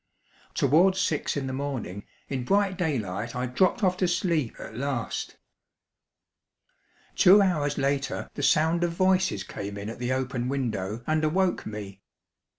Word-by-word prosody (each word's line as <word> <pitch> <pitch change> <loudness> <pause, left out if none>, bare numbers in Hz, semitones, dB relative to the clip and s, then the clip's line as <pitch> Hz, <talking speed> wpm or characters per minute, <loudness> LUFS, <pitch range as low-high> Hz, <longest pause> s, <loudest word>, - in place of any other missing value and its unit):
Towards 175 +8 +4
six 160 -6 0
in 140 - -2
the 130 - -4
morning, 130 -8 -4 0.2
in 130 -3 -3
bright 195 +6 +2
daylight, 115 - -2
I 125 0 -1
dropped 185 - +1
off 185 -1 +2
to 185 - +2
sleep 170 - 0
at - - -8
last. 130 -1 -3 1.8
Two 190 +3 +7
hours 155 -7 +1
later 140 0 -1
the - - -5
sound 160 +4 +3
of 170 -1 0
voices 185 - +2
came 100 +1 -6
in 100 +1 -5
at 115 - -10
the 125 +1 -2
open 130 -1 -1
window 115 -5 -2
and 155 0 +1
awoke 180 +4 +1
me. 100 -2 -7
140 Hz, 150 wpm, -27 LUFS, 120-175 Hz, 1.8 s, Two